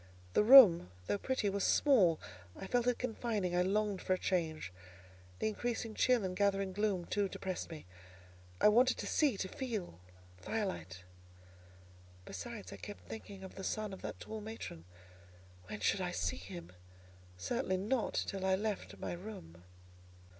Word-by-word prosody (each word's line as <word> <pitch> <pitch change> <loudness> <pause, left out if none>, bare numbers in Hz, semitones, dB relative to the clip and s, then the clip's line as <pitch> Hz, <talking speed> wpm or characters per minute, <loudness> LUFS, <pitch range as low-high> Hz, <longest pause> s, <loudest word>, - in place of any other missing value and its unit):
The - - +4
room, 210 - +9 0.2
though 205 - -1
pretty, 260 -4 -1
was 200 -1 0
small: 195 - +4 0.4
I - - -7
felt 245 +4 +1
it 245 - +2
confining: 220 -6 -2
I 180 - +3
longed 200 +1 0
for 185 - +1
a - - +1
change. 160 - -1 0.6
The - - 0
increasing 225 +1 -2
chill 250 -1 +3
and 185 -1 -2
gathering 195 -1 +1
gloom, 200 -3 0
too, 200 +1 0
depressed 185 -1 -4
me; 160 - -9 0.7
I - - +6
wanted 245 +5 +5
to - - -4
see—to 245 -11 +1
feel 210 - -5 0.4
firelight. 95 - -4 1.2
Besides, 95 -2 -7
I - - -8
kept 90 0 -10
thinking 190 - -8
of 190 - -9
the 195 - -8
son 215 0 -2
of 190 - -9
that - - -6
tall 220 -1 -6
matron: 210 - -7 0.8
when 105 - -6
should 195 - +2
I 180 - -1
see 85 -3 -1
him? 90 -1 -9 0.7
Certainly 190 - -1
not 215 +5 -1
till 195 -2 -4
I 190 0 +3
left 210 0 -3
my - - -4
room. 170 - -9
195 Hz, 155 wpm, -34 LUFS, 170-220 Hz, 1.2 s, room